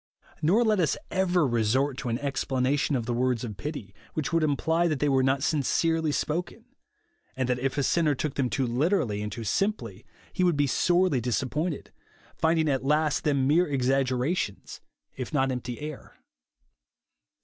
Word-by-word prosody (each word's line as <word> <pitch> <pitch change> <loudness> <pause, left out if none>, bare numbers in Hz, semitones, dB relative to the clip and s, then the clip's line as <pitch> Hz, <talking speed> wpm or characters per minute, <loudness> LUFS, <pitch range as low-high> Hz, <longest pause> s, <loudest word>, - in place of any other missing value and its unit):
Nor 190 +10 +3
let 215 -3 +2
us 165 - +1
ever 180 -3 +2
resort 125 +3 +1
to 130 - -3
an 115 - 0
exjDlanation 135 +1 0
of 115 - -3
the 120 - -1
words 125 -1 0
of 110 -4 -5
pity, 125 -6 -6 0.2
which 155 +1 -2
would 165 - +3
imply 160 +3 +1
that 155 -3 0
they 150 - 0
were 135 -1 +3
not 135 +1 +1
sincerely 160 +1 +1
spoken; 175 +10 -3 0.7
and 130 -1 -1
that 125 -1 0
if 135 +2 -2
a 140 - +1
sinner 155 0 +2
took 145 +1 -3
them 130 -3 0
too 135 0 0
literally 120 - 0
and 105 0 -4
too 115 +3 -6
simply, 115 - -2 0.3
he 185 - 0
would 175 -4 +2
be 145 - +3
sorely 175 0 +2
disappointed; 140 +6 -2 0.2
— - - -29
finding 160 -1 +3
at 135 -3 0
last 150 +2 +1
them 140 -3 +1
mere 165 +6 +3
exaggerations, 130 - -1 0.3
if 130 +3 -5
not 135 -1 +2
empty 125 -1 -5
air. 150 -1 -8
140 Hz, 170 wpm, -27 LUFS, 125-160 Hz, 0.7 s, Nor